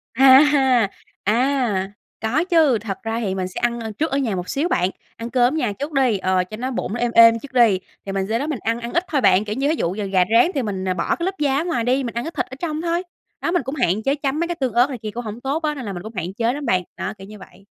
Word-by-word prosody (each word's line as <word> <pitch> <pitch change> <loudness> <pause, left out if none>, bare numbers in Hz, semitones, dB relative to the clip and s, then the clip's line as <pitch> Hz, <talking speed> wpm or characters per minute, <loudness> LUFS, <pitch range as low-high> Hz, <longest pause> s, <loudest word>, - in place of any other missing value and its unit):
A 265 +1 +8
ha! 265 -7 +3 0.3
À. 225 -4 +1 0.3
Có 250 +10 +1
chứ, 320 -9 +3
thật 205 -2 -5
ra 225 0 -2
thì 195 -5 -2
mình 185 -1 -2
sẽ 185 - -6
ăn, 240 0 0
ơ, 220 -1 -5
trước 315 -1 -1
ở 275 - +1
nhà 230 -8 0
một 180 0 -5
xíu 295 +5 0
bạn, 180 - +1 0.3
ăn 230 +1 -6
cơm 245 +1 +2
ở - - -1
nhà 240 -9 0
trước 290 +3 -4
đi, 255 -6 +2
ờ, 185 -1 +1
cho 215 +4 -9
nó 255 +3 -3
bụng 220 -4 -3
nó 240 - -3
êm 240 -1 0
êm 230 0 +7
trước 270 +2 -12
đi. 230 -7 +4 0.3
Thì 195 - -4
mình 195 0 -1
sau 230 - 0
đó 290 - -2
mình 290 -6 -3
ăn 230 +2 -1
ăn 235 0 -6
ít 345 - +2
thôi 285 -4 0
bạn, 195 -1 +4
kiểu 210 0 -3
như, 275 +2 0
thí 315 - +2
dụ 180 - -2
giờ 210 - -3
gà 190 -2 +3
rán 235 +7 +6
thì 270 - +1
mình, 195 -4 -3
ờ, 185 - +1
bỏ - - -1
cái 340 - -3
lớp 385 +1 -2
da 280 -2 +1
ở 300 - 0
ngoài 330 -10 -1
đi, 255 +3 +1
mình 235 -2 -5
ăn 235 - -1
cái 325 - -5
thịt - - 0
ở 260 - -10
trong 315 -2 -3
thôi. 340 +1 -1 0.4
Đó, - - -1
mình 355 -4 +1
cũng 265 +4 -5
hạn 220 - 0
chế 275 +4 +1
chấm 280 0 -2
mấy 340 - 0
cái 345 - -3
tương 260 -7 -2
ớt 245 +4 +4
này 260 - -5
kia 215 -1 -6
cũng 240 +2 -5
hổng 220 +3 -6
tốt 285 +5 -2
á, 300 -1 0
nên 260 -5 -6
là 200 - -4
mình 175 - -7
cũng 220 - -8
hạn 180 0 -4
chế 230 +3 0
lắm 290 +1 -5
bạn. 185 -6 +1
Đó, 210 - -3
kiểu 195 - -11
như 210 0 -11
vậy. 195 - -16
240 Hz, 320 wpm, -21 LUFS, 210-280 Hz, 0.4 s, A